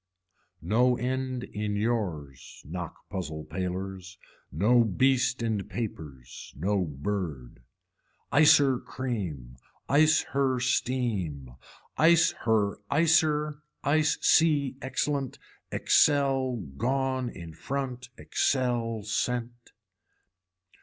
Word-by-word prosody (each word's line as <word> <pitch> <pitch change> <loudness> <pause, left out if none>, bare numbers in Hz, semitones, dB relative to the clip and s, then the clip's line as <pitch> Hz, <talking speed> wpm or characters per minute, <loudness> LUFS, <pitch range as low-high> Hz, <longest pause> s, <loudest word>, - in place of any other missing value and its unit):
No 120 +7 +3
end 130 0 -2
in 105 0 -4
yours, 95 - -3
knock 85 +1 -7
puzzler 80 -5 -4
palers, 95 +1 -5 0.3
no 115 - +4
beast 125 +3 +1
in 110 -3 -1
papers, 75 - -7
no 95 +4 0
bird. 75 -5 -5 0.7
Icer 145 -3 +5
cream, 90 - -5 0.3
ice 155 +4 +4
her 135 -2 +1
steam, 110 - -1 0.4
ice 165 +1 +5
her 110 -3 +2
icer 150 -1 +2 0.2
ice 150 +1 +2
sea 145 -5 +3
excellent, 135 0 -2 0.3
excel 135 -3 +3 0.2
gone 130 +1 0
in 85 -7 -10
front 130 - -5
excel 120 -4 -1
sent. 120 +2 -3
120 Hz, 85 wpm, -28 LUFS, 95-135 Hz, 0.7 s, Icer